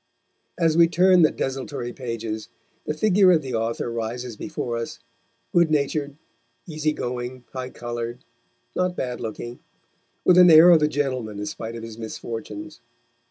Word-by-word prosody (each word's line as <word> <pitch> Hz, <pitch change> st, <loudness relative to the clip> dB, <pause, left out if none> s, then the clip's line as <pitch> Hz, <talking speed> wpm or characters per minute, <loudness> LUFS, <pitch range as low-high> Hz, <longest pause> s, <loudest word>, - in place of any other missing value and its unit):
As 165 Hz, -2 st, +2 dB
we 170 Hz, 0 st, +6 dB
turn 180 Hz, +2 st, +5 dB
the 155 Hz, -, +6 dB
desultory 130 Hz, -2 st, -4 dB
pages, 115 Hz, -3 st, -5 dB, 0.4 s
the 150 Hz, -, -1 dB
figure 190 Hz, +1 st, +4 dB
of 160 Hz, -3 st, +2 dB
the 130 Hz, -2 st, -5 dB
author 115 Hz, +1 st, -2 dB
rises 115 Hz, +1 st, -4 dB
before 125 Hz, -2 st, -4 dB
us, 115 Hz, 0 st, -4 dB, 0.6 s
good 170 Hz, -2 st, +4 dB
natured, 145 Hz, -1 st, -1 dB, 0.5 s
easygoing, 130 Hz, -6 st, -3 dB
high 130 Hz, -1 st, -4 dB
coloured, 120 Hz, 0 st, -6 dB, 0.5 s
not 180 Hz, 0 st, 0 dB
bad 125 Hz, -5 st, -4 dB
looking, 120 Hz, +2 st, -6 dB, 0.7 s
with 180 Hz, 0 st, +6 dB
an 180 Hz, -1 st, +8 dB
air 165 Hz, +2 st, +9 dB
of 165 Hz, -3 st, +6 dB
a 150 Hz, -, +4 dB
gentleman 130 Hz, -8 st, -2 dB
in 105 Hz, -, -4 dB
spite 115 Hz, +2 st, -6 dB
of 115 Hz, -, -7 dB
his 115 Hz, 0 st, -9 dB
misfortunes. 115 Hz, +7 st, -7 dB
130 Hz, 150 wpm, -24 LUFS, 115-155 Hz, 0.7 s, air